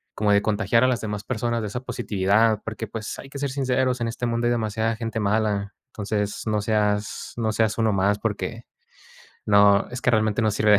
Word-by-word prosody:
como 105 -1 +1
de 100 - +4
contagiar 110 +3 +2
a - - +5
las 125 -2 +1
demás 105 -1 -4
personas 120 -1 -1
de 105 - -3
esa 105 +5 -4
positividad. 105 -1 +1
Porque, 110 0 -4
pues 110 +1 -6
hay 135 - -10
que 140 - -7
ser 140 0 -1
sinceros, 130 -2 0
en 115 - 0
este 120 +1 -4
mundo 120 0 0
hay - - +2
demasiada 110 -1 0
gente 115 -1 -3
mala. 105 -1 0
Entonces, 105 -3 -3
no 105 -1 +1
seas 105 -1 -1
no 110 -2 0
seas 110 0 +1
uno 110 -2 +2
más 100 +2 +2
porque, 115 +2 -3 0.8
no, 100 -1 +5
es 125 +1 -5
que 125 - +3
realmente 110 0 +2
no 110 - +3
sirve 105 +1 +3
de 105 - +7
110 Hz, 210 wpm, -24 LUFS, 105-115 Hz, 0.8 s, de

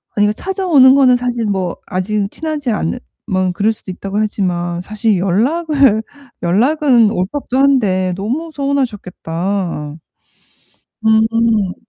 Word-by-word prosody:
아니 205 - +3
그 210 - 0
찾아오는 325 - +3
거는 260 -3 +5
사실 245 -2 -2
뭐 190 -4 -2
아직은 195 +2 -2
친하지 305 -5 -3
않으면 185 -2 -3
그럴 205 +4 +1
수도 205 - -9
있다고 195 +2 -5
하지만 175 -5 -1
사실 215 +1 -1
연락을 255 - +2 0.4
연락은 240 - +3
올 180 -3 0
법도 275 -3 -3
한데 205 -10 +2
너무 255 - -3
서운하셨겠다. 195 - -3 1.1
음 220 0 +4
음. 220 -5 +1
215 Hz, 275 characters per minute, -16 LUFS, 185-265 Hz, 1.1 s, 거는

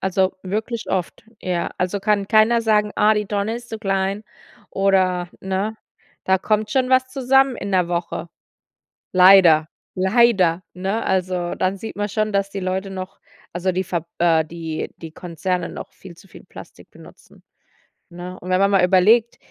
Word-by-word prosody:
Also, 190 0 0
wirklich 220 +4 -4
oft, 185 +2 -3 0.2
ja. 180 -2 -2
Also, 185 +2 -1
kann 200 0 +1
keiner 220 +3 +4
sagen: 210 -2 +2
„Ah, 215 +1 +4
die 210 -1 -1
Tonne 205 +2 -2
ist 240 0 -11
zu 220 - -6
klein,“ 195 0 -2 0.5
oder 185 -2 +1
ne? 195 +3 -3 0.5
Da 190 0 +2
kommt 215 +2 -1
schon 260 0 +1
was 260 0 +3
zusammen 270 0 +3
in 200 - -5
'ner 180 -2 +2
Woche. 170 0 -4 0.8
Leider, 180 -4 +6 0.3
leider, 190 -3 +3
ne? 195 +5 -2
Also, 180 -2 -1
dann 185 +1 -1
sieht 220 +2 -8
man 205 0 -2
schon, 215 +1 -1
dass 200 0 0
die 195 -1 -5
Leute 190 +1 -3
noch 185 0 -8 0.3
also, 180 +2 -1
die 185 +1 -2
Ver 170 -1 -4
äh, 165 -2 +3
die 160 -1 -6
die 165 -1 -9
Konzerne 175 +1 -3
noch - - -9
viel 185 -3 -13
zu 195 - -19
viel - - -15
Plastik - - -14
benutzen, - - -18 0.7
ne? 175 +1 -9
Und 180 - -9
wenn 185 0 +2
man 200 0 +3
mal 190 -2 +3
überlegt, 210 +6 +4
190 Hz, 170 wpm, -21 LUFS, 180-210 Hz, 0.8 s, Leider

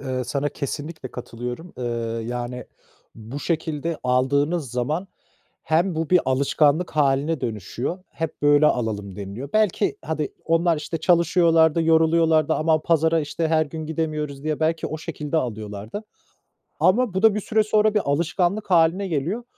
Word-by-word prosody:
Eee, 130 -2 -3
sana 140 +4 -1
kesinlikle 145 0 -6
katılıyorum. 125 +7 -7
Eee, 125 - -3 0.4
yani 125 +1 -4 0.5
bu 115 +6 -8
şekilde 160 -1 -2
aldığınız 140 +4 +1
zaman 150 +10 -2 0.5
hem 170 +3 +1
bu 160 0 -2
bir 180 - +6
alışkanlık 140 +5 +2
hâline 140 +1 +2
dönüşüyor, 115 - -4
"Hep 160 -2 -5
böyle 145 +1 +5
alalım." 105 -7 -1
deniliyor 105 +7 -6
Belki, 210 -9 +2
hadi, 155 +1 -2 0.2
onlar, 165 0 +2
işte, 155 +2 -4
çalışıyorlar 165 -2 +4
da, 165 - +1
yoruluyorlar 160 0 +3
da... 160 - +2
Aman, 155 0 +2
pazara, 165 0 +2
işte, 160 +2 -2
her 155 -1 +2
gün 155 +1 -6
gidemiyoruz 155 -3 -3
diye 155 0 -2
belki 160 0 0
o 155 - -5
şekilde 155 -1 -4
alıyorlardı. 110 - -4 0.8
Ama 215 +2 +3
bu 190 - -1
da 220 -2 +6
bir 215 - -1
süre 215 +1 +1
sonra 215 0 +2
bir 210 - +3
alışkanlık 175 +7 0
hâline 175 +3 +3
geliyor. 170 - -2
155 Hz, 150 wpm, -23 LUFS, 135-170 Hz, 0.8 s, bir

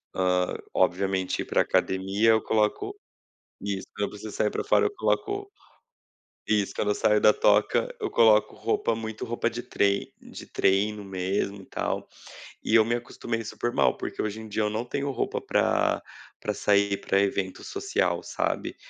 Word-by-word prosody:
hã, 90 -1 +1 0.2
obviamente, 95 0 +1
ir - - -4
para - - +2
academia, 95 +4 +2
eu 110 - +4
coloco 105 -1 0 0.7
isso, 100 -1 -3
quando 105 0 -2
eu 110 +1 -7
saio 105 +1 +1
para - - -3
fora, 435 - +4
eu 410 - -4
coloco 400 +2 -1 1.0
isso, 105 -2 +1
quando 105 - 0
eu - - 0
saio 105 0 +3
da 105 - +7
toca, 105 - +2
eu 425 - -2
coloco 110 -2 +4
roupa 115 0 0
muito 110 -1 -5
roupa 120 0 -1
de 120 +1 -5
trei 100 -1 0
de - - -11
treino 100 +2 +1
mesmo, 95 +1 -2
e - - -14
tal. - - -3 0.6
E 110 - 0
eu 110 - +6
me 120 - 0
acostumei 120 -1 -4
super 120 +2 -3
mal, - - +3
porque - - -4
hoje 110 +1 -3
em 110 - -9
dia 105 +1 -1
eu 105 - +1
não 110 +3 -2
tenho 140 +3 -2
roupa 135 - -2
para - - +1 0.4
para - - -2
sair 100 -1 +2
para 100 - +2
evento 95 -1 -1
social, 400 -1 -1
sabe. - - -2
105 Hz, 170 wpm, -26 LUFS, 100-115 Hz, 1.0 s, da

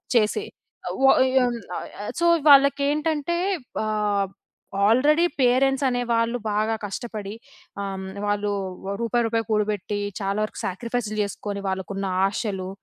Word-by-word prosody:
చేసే 235 - +2 0.4
అవ్ - - -5 0.4
య - - +8
ఆహ్, 210 -3 -5
సో, - - +3 0.3
వాళ్ళకేంటంటే 290 +3 +3 0.5
ఆహ్, 210 -2 0 0.6
ఆల్రెడీ 295 +9 +4 0.2
పేరెంట్సనే 255 0 +3
వాళ్ళు 230 +1 +1
బాగా 215 +2 +1
కష్టపడి 205 0 -5 0.5
ఆహ్, 195 -1 -3
హ్మ్, 190 0 -6 0.2
వాళ్ళు 205 0 0 0.4
ఓ - - -1
రూపాయి, 235 +1 +1
రూపాయి 225 -1 -1
కూడబెట్టి, 210 -1 0 0.2
చాలా 195 +1 -1
వరకు 215 - -5
సాక్రిఫైస్ 230 +3 -3
చేసుకొని, 200 0 -4
వాళ్ళకున్న 190 +1 -3 0.2
ఆశలు 195 -2 -2
215 Hz, 115 wpm, -24 LUFS, 200-245 Hz, 0.6 s, య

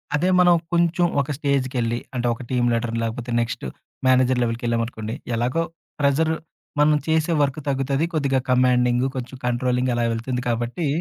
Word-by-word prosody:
అదే 175 +5 +1
మనం 175 -1 +6 0.2
కొంచెం 170 +1 +3 0.2
ఒక 140 - -4
స్టేజ్‌కెళ్లి 130 -5 0 0.2
అంటే 120 -1 0
ఒక 115 - -9
టీమ్ 125 -2 +1
లీడర్, 115 0 -1
లేపోతే 115 +2 -4
నెక్స్ట్ 115 - -3 0.4
మేనేజర్ 130 0 +4
లెవెల్‌కెళ్ళామనుకోండి, 115 -1 -2 0.2
ఎలాగో 125 +8 0 0.4
ప్రెజర్ 145 +3 +2 0.5
మనం 150 0 +5
చేసే 160 +1 +2
వర్క్ 140 0 0
తగ్గుతది. 135 +2 0
కొద్దిగా 140 -4 +1
కమాండింగ్, 125 0 +3
కొంచెం 130 0 -5
కంట్రోలింగ్ 125 +1 +1
అలా 120 0 +1
వెళ్తుంది 125 +2 -3
కాబట్టి, 120 +7 -1
125 Hz, 140 wpm, -23 LUFS, 120-140 Hz, 0.5 s, మనం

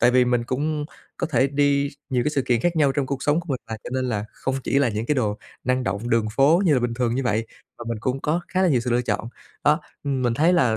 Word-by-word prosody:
tại 120 +1 +5
vì 125 0 +4
mình 120 -1 +1
cũng 150 +4 -1 0.3
có - - -1
thể 130 -4 +2
đi 140 0 +2 0.2
nhiều 125 -2 +2
cái 150 - +1
sự 140 -3 0
kiện 120 -2 +1
khác 175 +3 0
nhau 145 -3 +4
trong 140 -1 -1
cuộc 140 0 -3
sống 150 +3 +2
của 175 - -14
mình 130 -3 -1
mà, 110 - -2
cho - - -6
nên 130 0 0
là 105 -3 -1
không 135 - -3
chỉ 140 - +2
là 140 -3 +3
những 110 +1 -3
cái 150 - +2
đồ 105 -6 0 0.3
năng 130 0 +1
động 100 +3 -2
đường 115 -1 +2
phố 155 +8 +5
như 160 -5 +4
là 125 - +2
bình 120 -1 -1
thường 120 -1 0
như 135 - 0
vậy 110 -1 0 0.3
mà 120 - -7
mình 115 -1 -2
cũng 130 +2 -1
có 160 +5 0
khá 185 - +1
là 185 - +4
nhiều 130 -6 +3
sự 125 +1 -3
lựa 120 +1 +2
chọn. 115 -2 -2 0.4
Đó, 150 +3 +4 0.2
ừm, 135 -2 -1
mình 120 -1 +1
thấy 160 +8 +3
là 125 -11 +3
130 Hz, 295 wpm, -23 LUFS, 120-145 Hz, 0.4 s, tại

